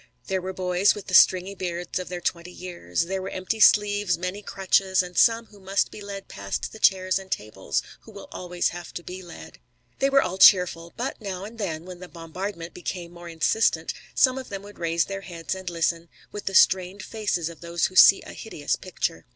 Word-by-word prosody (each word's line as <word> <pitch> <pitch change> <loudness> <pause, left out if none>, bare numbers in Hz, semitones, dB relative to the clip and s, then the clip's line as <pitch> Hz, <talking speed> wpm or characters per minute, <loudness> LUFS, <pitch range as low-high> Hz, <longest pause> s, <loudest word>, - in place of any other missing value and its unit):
There 190 -1 -1
were 185 +1 -4
boys 185 +1 +2
with 205 - -8
the - - -8
stringy 185 +1 +6
beards 180 -2 -4
of 185 - -6
their 180 -1 -5
twenty 170 0 -2
years. 175 - -3
There 190 +2 -3
were 185 - -5
empty 185 +4 -3
sleeves, 205 -2 +4
many 180 +4 -4
crutches, 190 -1 +1
and 180 0 -10
some 230 +3 +4
who 210 -2 -18
must 195 +1 0
be - - -10
led 200 -1 -7
past 100 0 -4
the 220 - -11
chairs 185 -2 +3
and 190 -1 -12
tables 95 - -2 0.2
who - - -15
will - - -11
always 180 -1 -2
have 175 0 -8
to 175 - -5
be 185 +2 -8
led. 175 -2 -12 0.4
They 275 - +3
were 275 0 +4
all 185 +2 -4
cheerful. 175 -5 +6
But 245 0 -4
now 195 -2 -5
and 225 +2 -11
then, 165 -5 -3
when 180 -1 -9
the 180 - -9
bombardment 170 +1 -6
became 175 -1 -6
more 175 0 -10
insistent, 165 +7 +1 0.2
some 260 0 +4
of 260 - -9
them 195 -1 -6
would 205 0 -13
raise 165 -1 +1
their 195 0 -5
heads 170 -3 -5
and 190 -1 -5
listen, 170 0 -1 0.2
with 205 - -7
the 195 - -2
strained 190 +2 +4
faces 205 -7 -2
of 170 -1 -9
those 170 0 -1
who 185 - -4
see 195 - +8
a - - -10
hideous 150 -10 -3
picture. 175 -2 -4
185 Hz, 215 wpm, -25 LUFS, 170-200 Hz, 0.4 s, see